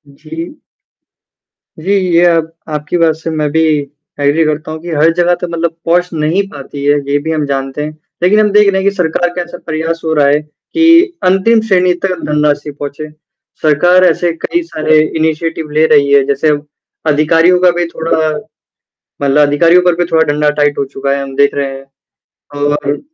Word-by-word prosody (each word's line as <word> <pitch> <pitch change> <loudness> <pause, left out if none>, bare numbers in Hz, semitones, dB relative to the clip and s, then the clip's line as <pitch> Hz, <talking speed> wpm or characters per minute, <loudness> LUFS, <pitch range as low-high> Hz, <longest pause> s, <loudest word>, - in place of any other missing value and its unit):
जी। 325 - -8 1.2
जी, 185 +5 -3 0.2
ये 175 +1 +5
आप 165 -2 +2 0.3
आपकी 150 +4 -3
बात 165 -2 +2
से 160 +1 -6
मैं 155 -2 -1
भी 160 +1 +1 0.6
एग्री 145 +3 +2
करता 155 0 -3
हूँ 160 - -6
कि 175 - -8
हर 160 +2 +3
जगह 175 0 +2
का 175 - -2
मतलब 170 -1 -3
पहुँच 175 +2 +1
नहीं 160 +5 0
पाती 140 0 -9
है 145 0 +3
ये 145 - +2
भी 160 - -1
हम 155 -2 -1
जानते 135 +1 -3
हैं। 155 - -5 0.3
लेकिन 210 +4 +4
हम 210 -1 +3
देख 210 -1 +5
रहे 190 0 0
हैं 200 - +2
कि 200 - -9
सरकार 175 -1 0
का 180 - -2
ऐसा 175 0 -8
प्रयास 165 +1 -3
हो 160 - 0
रहा 145 -2 +3
है 145 +1 +3
कि 330 - +2
अंतिम 195 +5 +3
श्रेणी 180 -2 +3
तक 185 -3 -2
धनराशि 150 -1 0
पहुँचे। 145 +1 -7 0.5
सरकार 175 +5 +3
ऐसे 170 0 +1
कई 345 - -1
सारे 155 0 +2 0.2
इनिशिएटिव 160 0 -2
ले 160 - +5
रही 140 -1 +3
है। 140 -1 +5
जैसे 140 +2 +1
अब 145 0 -1 0.5
अधिकारियों 165 +4 +3
का 180 -1 +5
भी 175 0 -1
थोड़ा 160 -1 -1 0.9
मतलब 140 +1 +2
अधिकारियों 170 +5 +4
पर 175 -2 +2
भी 175 0 0
थोड़ा 160 0 +4
डंडा 150 0 +1
टाइट 145 0 +1
हो 140 - -1
चुका 140 0 -2
है 140 - -3
हम 135 -1 -8
देख 140 0 +2
रहे 135 -1 -3
हैं। 135 - -14 0.8
और 145 0 -1
160 Hz, 190 wpm, -13 LUFS, 145-175 Hz, 1.2 s, ये